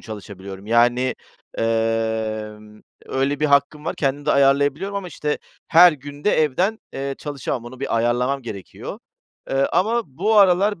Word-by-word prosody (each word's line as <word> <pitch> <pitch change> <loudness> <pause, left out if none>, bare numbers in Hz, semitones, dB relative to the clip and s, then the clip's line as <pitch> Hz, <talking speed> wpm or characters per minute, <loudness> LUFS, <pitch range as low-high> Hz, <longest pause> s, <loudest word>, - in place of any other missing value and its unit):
çalışabiliyorum. 100 -2 -9
Yani, 120 +2 +3 0.4
emm, 110 -1 -2 0.3
öyle 135 +2 -1
bir 150 - +3
hakkım 140 +1 +2
var, - - -2
kendim 140 +1 -1
de - - +3
ayarlayabiliyorum 145 +8 +2
ama, 190 -2 -4
işte, 150 -3 -3 0.3
her 175 +1 +8
gün 145 0 -10
de 210 - +4
evden, 185 +10 0
eee, 135 0 -4
çalışamam. 140 -4 -4
Onu 125 +2 -10
bir 140 - -1
ayarlamam 125 +4 0
gerekiyor. 100 -5 -8 0.5
Eee, 135 0 +2
ama 225 +6 +2
bu 190 +11 0
aralar 200 0 +4
135 Hz, 145 wpm, -21 LUFS, 115-150 Hz, 0.5 s, her